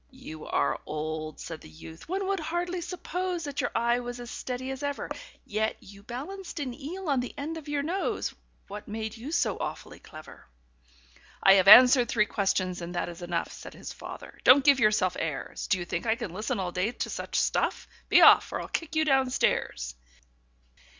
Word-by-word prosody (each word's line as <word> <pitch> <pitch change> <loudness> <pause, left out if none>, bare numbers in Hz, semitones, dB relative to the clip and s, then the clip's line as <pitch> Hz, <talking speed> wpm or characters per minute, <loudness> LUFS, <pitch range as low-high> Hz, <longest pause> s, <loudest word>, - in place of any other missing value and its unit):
"You 250 - -10
are - - 0
old," 155 0 -4
said 165 -2 -7
the - - -13
youth, 160 - -12
"one 385 +2 -1
would 390 0 0
hardly 345 +3 -2
suppose 360 0 -3
That 285 -2 -3
your 245 - -1
eye 235 +1 +2
was 245 0 -6
as 240 -1 -8
steady 260 +1 -4
as 265 +1 -6
ever; 285 -1 -3 0.3
Yet 220 +1 -1
you 200 +1 -14
balanced 300 - -7
an 265 -4 -3
eel 330 +8 -7
on 275 -3 +2
the 245 - -5
end 305 +3 -4
of 320 -3 -9
your 290 -1 -1
nose 365 +6 -2 0.3
What 205 +1 -8
made 220 +1 -4
you 245 +6 -7
so 340 - 0
awfully - - -6
clever?" 155 - -13 1.0
"I 195 - +8
have 195 -1 +4
answered 250 +2 +9
three 210 -2 +3
questions, 185 -3 -1
and 175 +1 -6
that 175 - -1
is 170 0 -10
enough," 175 -1 -2
Said - - -10
his - - -8
father. - - -10
"Don't 270 +2 +7
give 280 -2 +6
yourself 210 -6 +3
airs! 155 -4 -4
Do 190 - +2
you 175 - -4
think 175 +5 -3
I 220 - +3
can 230 -8 -6
listen 220 +4 -2
all 180 -2 -2
day 185 +7 -1
to - - -4
such - - -2
stuff? - - 0 0.2
Be - - +6
off, - - +7
or - - -2
I'll - - -6
kick 330 -1 -3
you 315 0 +3
down 270 -3 +3
stairs. - - 0
245 Hz, 200 wpm, -28 LUFS, 185-290 Hz, 1.0 s, answered